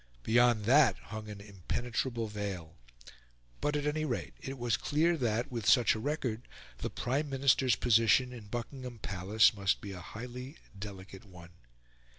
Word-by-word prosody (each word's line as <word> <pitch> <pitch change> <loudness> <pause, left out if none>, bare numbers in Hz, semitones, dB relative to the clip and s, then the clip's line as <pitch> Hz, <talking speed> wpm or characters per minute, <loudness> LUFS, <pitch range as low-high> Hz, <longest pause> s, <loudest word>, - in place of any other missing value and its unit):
Beyond 120 -2 +3
that 130 -4 +5
hung 110 -1 -8
an 105 -1 -7
impenetrable 115 +4 -3
veil. 100 -6 -5 0.8
But 150 - 0
at 145 0 -1
any 150 +1 0
rate 130 -6 -3
it 135 0 -6
was 120 -2 +1
clear 165 +4 +1
that, 120 -2 -1
with 115 -4 0
such 120 -4 +5
a 110 - -4
record, 125 -4 -3 0.3
the - - -3
Prime 140 +4 -2
Minister's 135 -2 +3
position 120 +2 +3
in 115 -4 -10
Buckingham 120 +2 -6
Palace 100 +1 +3
must 100 -2 0
be 100 - -7
a 90 -2 -7
highly 125 - -8 0.2
delicate 95 -1 -9
one. 90 -3 -13
115 Hz, 155 wpm, -32 LUFS, 105-130 Hz, 0.8 s, that